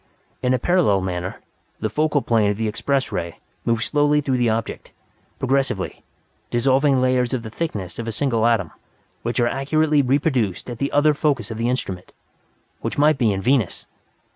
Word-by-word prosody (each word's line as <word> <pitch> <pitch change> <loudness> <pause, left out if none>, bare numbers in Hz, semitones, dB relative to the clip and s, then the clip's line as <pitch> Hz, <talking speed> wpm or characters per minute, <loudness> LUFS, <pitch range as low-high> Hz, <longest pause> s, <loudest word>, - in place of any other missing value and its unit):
In 125 - +1
a - - +1
parallel 145 - +2
manner, 90 0 -4 0.4
the 110 - -1
focal 150 +4 +1
plane 110 -3 +2
of 100 - -1
the 110 0 -1
Express 135 +5 -1
Ray 85 -1 -4 0.3
moves 115 -1 +1
slowly 145 0 +2
through 135 -3 0
the 120 -2 +2
object, 110 0 -3 0.5
progressively, 135 -7 -1 0.5
dissolving 135 +3 +3
layers 125 -1 +1
of 120 - -4
the 110 - -7
thickness 105 - -4
of 115 - -4
a - - -1
single 115 -2 +1
atom, 100 -9 +1 0.5
which 120 +2 -2
are 120 - +4
accurately 150 +3 +2
reproduced 130 - 0
at 120 - -7
the 140 - -1
other 150 +1 +4
focus 140 -7 0
of 110 - -5
the 115 +1 +1
instrument 95 -8 -3 0.7
which - - -4
might 150 0 +4
be 115 -4 +3
in 95 -1 -2
Venus! 125 -6 +1
125 Hz, 175 wpm, -22 LUFS, 110-140 Hz, 0.7 s, are